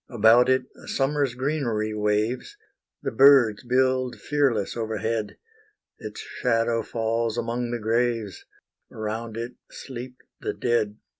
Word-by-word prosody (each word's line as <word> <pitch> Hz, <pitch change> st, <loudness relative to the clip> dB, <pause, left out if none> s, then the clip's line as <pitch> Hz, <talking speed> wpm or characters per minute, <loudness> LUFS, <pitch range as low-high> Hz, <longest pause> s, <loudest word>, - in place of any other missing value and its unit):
About 120 Hz, +1 st, +5 dB
it 130 Hz, 0 st, +3 dB, 0.2 s
summer's 135 Hz, -2 st, 0 dB
greenery 125 Hz, -6 st, -1 dB
waves; 105 Hz, -, -1 dB, 0.5 s
The -, -, -1 dB
birds 135 Hz, -6 st, +6 dB
build 130 Hz, 0 st, +1 dB
fearless 135 Hz, -9 st, 0 dB
overhead; 110 Hz, -1 st, -2 dB, 0.6 s
Its -, -, -8 dB
shadow 115 Hz, -, 0 dB
falls 115 Hz, 0 st, -1 dB
among 120 Hz, +1 st, -2 dB
the 120 Hz, -, -2 dB
graves; 115 Hz, -3 st, -1 dB, 0.5 s
Around 110 Hz, +1 st, -5 dB
it 120 Hz, +2 st, -4 dB, 0.2 s
sleep 125 Hz, 0 st, -8 dB, 0.2 s
the -, -, -3 dB
dead. 110 Hz, -3 st, 0 dB
120 Hz, 115 wpm, -25 LUFS, 110-130 Hz, 0.6 s, birds